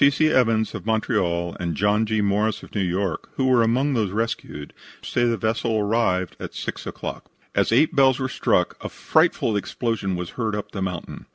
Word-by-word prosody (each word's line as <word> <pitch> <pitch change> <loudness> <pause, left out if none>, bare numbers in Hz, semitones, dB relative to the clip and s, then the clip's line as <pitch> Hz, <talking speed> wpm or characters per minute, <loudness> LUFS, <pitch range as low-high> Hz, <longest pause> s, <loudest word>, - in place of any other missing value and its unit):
C. 140 - +8
C. 155 +2 +2
Evans, 115 -5 +2
of - - -6
Montreal, 85 -6 0
and 85 -2 -2
John 105 +5 +2
G. 110 0 +1
Morris, 105 +1 0
of - - -13
New 105 - 0
York, 95 0 -2
who 130 - 0
were 130 -2 +4
among 130 +5 +2
those 110 -5 +1
rescued, 105 -8 -4 0.3
say 120 - 0
the 115 -1 +1
vessel 110 0 0
arrived 100 -4 +1
at - - -7
6 - - -5
o'clock. - - -6 0.2
As - - +1
eight 135 +7 +3
bells 135 -2 +5
were 130 - -1
struck - - +1
a - - -4
frightful 110 - +1
explosion 100 -2 -2
was 90 -1 -5
heard 110 -4 -2
up 105 - -5
the 95 - -5
mountain. 90 -3 -5
110 Hz, 195 wpm, -23 LUFS, 95-120 Hz, 0.3 s, C